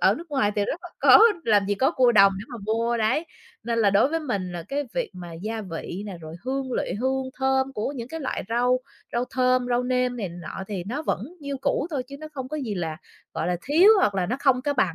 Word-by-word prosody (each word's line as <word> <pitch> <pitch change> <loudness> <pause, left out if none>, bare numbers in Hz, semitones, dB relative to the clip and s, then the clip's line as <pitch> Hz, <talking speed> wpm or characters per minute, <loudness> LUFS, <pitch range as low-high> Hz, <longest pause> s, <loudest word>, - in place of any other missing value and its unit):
ở - - +5
nước 335 -1 -10
ngoài 210 -8 +1
thì 205 - +2
rất 330 - -3
là - - -8
có - - +8 0.3
làm 205 -3 +3
gì 205 - +1
có 265 +8 +2
cua 255 -7 +4
đồng 195 -2 +7
để 195 - -7
mà 240 - -7
mua, 230 +2 +1
đấy. 230 +9 +1 0.4
Nên 230 -1 -1
là 210 -3 +4
đối 200 +6 +4
với 325 +2 -1
mình 200 - -3
là 175 -1 -5
cái 285 +1 -1
việc - - -1
mà 175 -2 -8
gia 215 +7 -4
vị 180 +1 -6
nè, 195 - -6
rồi 160 0 -9
hương 265 0 -2
liệu - - -1
hương 260 +1 -1
thơm 265 0 +1
của 245 +3 -2
những 240 -3 -6
cái 325 +3 -6
loại 270 - -3
rau, 245 +2 +2 0.3
rau 240 +1 0
thơm, 255 -1 +2
rau 245 0 +1
nêm 250 0 0
này 205 -6 -3
nọ 170 +2 -7
thì 190 -4 -4
nó 255 - -4
vẫn - - -1 0.2
như 280 -1 -4
cũ 280 - 0
thôi 280 -5 -1
chứ 275 +2 -10
nó 310 - -7
không 265 -3 -6
có 305 - -4
gì 235 -8 -3
là, 160 -3 -3 0.4
gọi - - -2
là, 180 0 0
thiếu 325 +8 +5
hoặc 210 - +2
là 185 -2 0
nó 245 - -1
không 260 -3 +3
có 290 - 0
bằng 185 -10 +1
245 Hz, 260 wpm, -25 LUFS, 200-270 Hz, 0.4 s, có